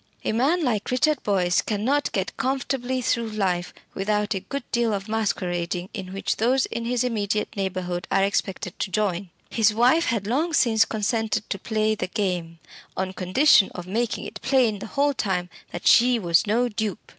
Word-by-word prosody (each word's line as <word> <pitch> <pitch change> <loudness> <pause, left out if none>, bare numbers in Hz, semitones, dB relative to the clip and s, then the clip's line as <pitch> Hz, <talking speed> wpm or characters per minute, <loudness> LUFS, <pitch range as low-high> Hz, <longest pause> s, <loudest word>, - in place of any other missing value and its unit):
A - - +1
man 280 +10 +2
like 220 -6 -1
Richard 280 +3 +2
Boyce 185 -3 +2
cannot 245 +8 0
get 190 -1 -2
comfortably 260 -1 -1
through 235 -1 0
life 185 -5 -1 0.2
without 210 +2 0
a 195 - -2
good 280 +7 -5
deal 235 -3 +1
of 195 +1 -5
masquerading 180 -4 -2
in 190 -4 -6
which 195 +1 -2
those 250 +3 +2
in 230 0 -5
his 245 +1 0
immediate 215 -3 -1
neighbourhood 185 -2 -3
are 195 0 +2
expected 195 -2 -2
to - - -1
join. 190 -1 -1 0.2
His 215 -2 +3
wife 255 +9 +4
had 225 - -1
long 300 +10 0
since 225 -2 +4
consented 220 0 -1
to 195 - -2
play 215 0 0
the 215 - -3
game, 180 -5 -2 0.4
on 190 0 -2
condition 190 +4 +4
of 180 - -6
making 225 +5 -2
it - - -8
plain 245 -6 +2
the - - -7
whole 285 +3 +1
time 180 -7 -2 0.2
that 175 - -7
she 245 +1 +6
was 175 -3 +2
no 235 +4 +2
dupe. 215 -4 -2
215 Hz, 180 wpm, -24 LUFS, 190-240 Hz, 0.4 s, she